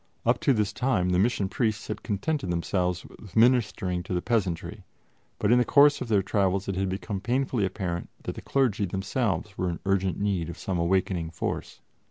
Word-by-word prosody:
Up -, -, +3 dB
to -, -, +3 dB
this 105 Hz, -5 st, +1 dB
time 105 Hz, -9 st, +1 dB
the 90 Hz, 0 st, +2 dB
Mission 105 Hz, -1 st, +2 dB
Priests 110 Hz, 0 st, -1 dB
had -, -, -5 dB
contented 105 Hz, -, -2 dB
themselves 90 Hz, +1 st, -1 dB
with 100 Hz, -4 st, -14 dB
ministering 110 Hz, -6 st, +3 dB
to 90 Hz, 0 st, -4 dB
the 90 Hz, -, 0 dB
peasantry, 100 Hz, -8 st, -1 dB, 0.5 s
but 105 Hz, -, +1 dB
in 125 Hz, -, +6 dB
the -, -, +4 dB
course 145 Hz, +3 st, +5 dB
of 125 Hz, -, -3 dB
their 105 Hz, -4 st, +2 dB
travels 95 Hz, -1 st, +1 dB
it 95 Hz, -, -2 dB
had 95 Hz, 0 st, 0 dB
become 95 Hz, +1 st, -4 dB
painfully 120 Hz, -2 st, 0 dB
apparent 90 Hz, -3 st, -4 dB
that -, -, -3 dB
the -, -, -8 dB
clergy 120 Hz, -7 st, +1 dB
themselves 95 Hz, 0 st, -2 dB
were 90 Hz, -, 0 dB
in 85 Hz, -, -4 dB
urgent 95 Hz, -1 st, +1 dB
need 95 Hz, -5 st, 0 dB
of 85 Hz, -, -7 dB
some 95 Hz, -3 st, -2 dB
awakening 85 Hz, -1 st, +1 dB
force. 80 Hz, -, -4 dB
100 Hz, 195 wpm, -27 LUFS, 90-115 Hz, 0.5 s, in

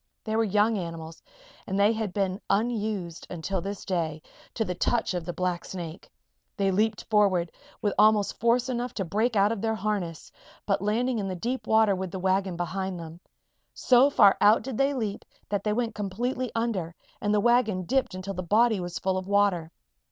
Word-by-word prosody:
They 220 Hz, -, -2 dB
were 225 Hz, -, +3 dB
young 210 Hz, +1 st, +2 dB
animals 165 Hz, -2 st, -7 dB, 0.5 s
and 190 Hz, -, -2 dB
they 205 Hz, +3 st, +5 dB
had 220 Hz, -3 st, -3 dB
been 190 Hz, 0 st, -1 dB
unused, 210 Hz, -6 st, -1 dB
until 180 Hz, +2 st, -3 dB
this 200 Hz, +2 st, -6 dB
day, 165 Hz, -4 st, -1 dB, 0.4 s
to 225 Hz, -, 0 dB
the 180 Hz, -, -2 dB
touch 225 Hz, +4 st, 0 dB
of 175 Hz, -2 st, -3 dB
the 175 Hz, -, -3 dB
blacksnake. 175 Hz, -1 st, -4 dB, 0.5 s
They 195 Hz, -1 st, +2 dB
leaped 210 Hz, +3 st, +1 dB
forward 195 Hz, -6 st, +2 dB, 0.3 s
with 205 Hz, -2 st, +1 dB
almost 210 Hz, -1 st, +4 dB
force 235 Hz, +2 st, +2 dB
enough 245 Hz, -1 st, -3 dB
to 195 Hz, -, -2 dB
break 220 Hz, +7 st, 0 dB
out 200 Hz, +1 st, +4 dB
of 225 Hz, -4 st, -3 dB
their 220 Hz, 0 st, 0 dB
harness, 200 Hz, -7 st, -3 dB, 0.3 s
but 195 Hz, -3 st, +1 dB
landing 230 Hz, +4 st, 0 dB
in 195 Hz, -, -2 dB
the 185 Hz, -, -3 dB
deep 235 Hz, +5 st, -3 dB
water 220 Hz, -2 st, +4 dB
with 185 Hz, 0 st, -4 dB
the 190 Hz, -, -6 dB
wagon 190 Hz, -1 st, 0 dB
behind 185 Hz, +1 st, -3 dB
them. 165 Hz, 0 st, -9 dB, 0.6 s
So 255 Hz, +2 st, +5 dB
far 205 Hz, -8 st, +5 dB
out 215 Hz, +2 st, +5 dB
did 260 Hz, -2 st, -5 dB
they 275 Hz, +1 st, +2 dB
leap 215 Hz, -5 st, -3 dB, 0.3 s
that 205 Hz, -1 st, -1 dB
they 210 Hz, -, 0 dB
went 230 Hz, +1 st, -1 dB
completely 235 Hz, +5 st, -3 dB
under 200 Hz, -8 st, -2 dB, 0.3 s
and 205 Hz, -, 0 dB
the 210 Hz, -, +3 dB
wagon 220 Hz, -4 st, +2 dB
dipped 260 Hz, 0 st, 0 dB
until 185 Hz, +1 st, -5 dB
the 185 Hz, -, -4 dB
body 215 Hz, +4 st, +3 dB
was 175 Hz, 0 st, -4 dB
full 185 Hz, 0 st, 0 dB
of 185 Hz, -, -9 dB
water. 200 Hz, -5 st, +2 dB
200 Hz, 190 wpm, -27 LUFS, 185-225 Hz, 0.6 s, they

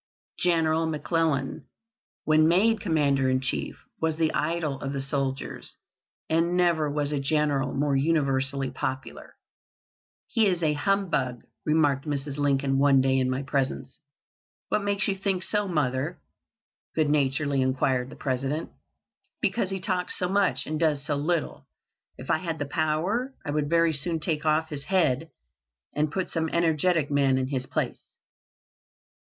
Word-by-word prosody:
General 165 Hz, -2 st, +2 dB
McClellan, 155 Hz, -3 st, -1 dB, 0.6 s
when 155 Hz, 0 st, +4 dB
made 210 Hz, +6 st, +3 dB
Commander 140 Hz, -6 st, +2 dB
in 130 Hz, 0 st, +2 dB
Chief, 130 Hz, 0 st, -3 dB, 0.2 s
was 160 Hz, -1 st, 0 dB
the 160 Hz, -1 st, +1 dB
idol 155 Hz, -4 st, -1 dB
of 135 Hz, +1 st, -3 dB
the 140 Hz, -, -2 dB
soldiers, 135 Hz, 0 st, -3 dB, 0.5 s
and 170 Hz, +2 st, +1 dB
never 170 Hz, -4 st, +2 dB
was 145 Hz, 0 st, -1 dB
a 145 Hz, -, 0 dB
general 145 Hz, -1 st, +1 dB
more 140 Hz, 0 st, +1 dB
universally 135 Hz, -2 st, +1 dB
popular. 130 Hz, 0 st, -5 dB, 0.9 s
"He 225 Hz, -4 st, +2 dB
is 180 Hz, -3 st, 0 dB
a 155 Hz, -1 st, +3 dB
humbug," 150 Hz, -8 st, 0 dB, 0.2 s
remarked 145 Hz, -3 st, +2 dB
Mrs. 140 Hz, -1 st, -3 dB
Lincoln 140 Hz, -1 st, +1 dB
one 140 Hz, -1 st, +5 dB
day 130 Hz, 0 st, +3 dB
in 130 Hz, 0 st, +1 dB
my 130 Hz, +2 st, -1 dB
presence. 135 Hz, -1 st, -2 dB, 0.7 s
"What 210 Hz, -, +1 dB
makes 200 Hz, -1 st, 0 dB
you 195 Hz, -, 0 dB
think 190 Hz, -1 st, -1 dB
so, 210 Hz, +3 st, 0 dB
mother?" 150 Hz, -1 st, -1 dB, 0.8 s
good 155 Hz, -2 st, +2 dB
naturedly 140 Hz, -1 st, +1 dB
inquired 130 Hz, -1 st, +1 dB
the -, -, -10 dB
President. 135 Hz, +4 st, -2 dB, 0.7 s
"Because 195 Hz, -, 0 dB
he 195 Hz, 0 st, -3 dB
talks 185 Hz, -2 st, -2 dB
so 180 Hz, -, 0 dB
much 195 Hz, +1 st, +1 dB
and 155 Hz, 0 st, -3 dB
does 150 Hz, -4 st, +1 dB
so 150 Hz, -2 st, 0 dB
little. 155 Hz, +3 st, -2 dB, 0.5 s
If 130 Hz, -, -4 dB
I 160 Hz, -, +2 dB
had 165 Hz, -1 st, -3 dB
the 145 Hz, -, -2 dB
power 170 Hz, -, -1 dB
I 145 Hz, -, -2 dB
would 145 Hz, -1 st, -1 dB
very 165 Hz, 0 st, +3 dB
soon 160 Hz, +3 st, -1 dB
take 155 Hz, -1 st, -1 dB
off 155 Hz, +1 st, +2 dB
his 145 Hz, -3 st, -6 dB
head, 165 Hz, -5 st, +1 dB, 0.7 s
and 150 Hz, 0 st, +1 dB
put 190 Hz, +2 st, -2 dB
some 160 Hz, -1 st, -1 dB
energetic 165 Hz, -2 st, +1 dB
man 140 Hz, -2 st, +3 dB
in 130 Hz, 0 st, -1 dB
his 130 Hz, -2 st, -3 dB
place." -, -, -2 dB
150 Hz, 150 wpm, -26 LUFS, 135-170 Hz, 0.9 s, one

